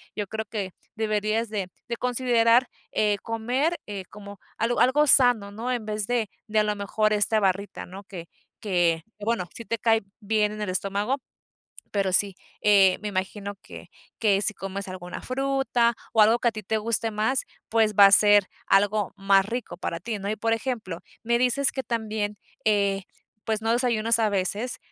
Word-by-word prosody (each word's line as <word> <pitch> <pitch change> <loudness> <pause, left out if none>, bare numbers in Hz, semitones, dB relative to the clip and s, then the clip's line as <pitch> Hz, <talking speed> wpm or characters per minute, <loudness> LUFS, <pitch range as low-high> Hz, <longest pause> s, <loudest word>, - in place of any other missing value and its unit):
yo 210 - -2
creo 220 +2 -5
que 200 -4 -4 0.2
deberías 215 +1 0
de 200 -4 -3 0.2
de 235 - -2
considerar, 245 -1 +3 0.2
eh, 210 -1 +1
comer, 250 +9 -1
eh, 200 -2 -6
como 205 -1 -11 0.2
algo 230 +2 0
algo 290 +4 +4
sano, 245 -7 +5
¿no?, 230 +5 -4
en 240 -4 -2
vez 210 -1 -2
de 235 -4 0 0.2
de 215 0 +1
a - - +4
lo 210 0 -1
mejor, 215 +1 0
esta 210 +1 +2
barrita, 195 +1 -1
¿no?, 190 +3 -10
que 175 -4 -9 0.3
que, 175 -5 +1 0.2
bueno, 210 -4 -1
sí 230 - -8
te 230 - -2
cae 225 0 +2 0.2
bien 210 0 +1
en 215 - -7
el 205 - -2
estómago, 200 +7 -1 0.7
pero 195 -2 0
sí, 195 0 +4 0.3
eh, 195 -3 +5
me 210 - -3
imagino 200 +1 -4
que - - -12 0.3
que 205 -3 +3
si 215 0 0
comes 195 +1 -5
alguna 180 -1 -7
fruta 265 -3 0 0.2
o 220 - +5
algo 225 +3 +5
que 240 - +2
a - - -1
ti 215 -1 -7
te 220 +3 -1
guste 225 +1 0
más, 220 +5 +1 0.3
pues, 220 -2 +2
va 200 0 +9
a 195 - +4
ser 205 -1 +6 0.2
algo 205 +1 +2
más 195 0 +3
rico 235 +3 -5
para 170 -1 -4
ti, 215 +3 -4
¿no? 200 +1 -3
Y, 215 - -2
por 225 +2 0
ejemplo, 225 -7 -3 0.2
me 235 +1 +2
dices 255 +3 +2
que 265 - -3
también, 215 -3 -3 0.3
eh, 200 -2 +2 0.4
pues, 220 -1 -1
no 225 +1 +1
desayunas 230 -2 +2
a 220 - +3
veces, 205 +5 -1
215 Hz, 185 wpm, -25 LUFS, 200-230 Hz, 0.7 s, va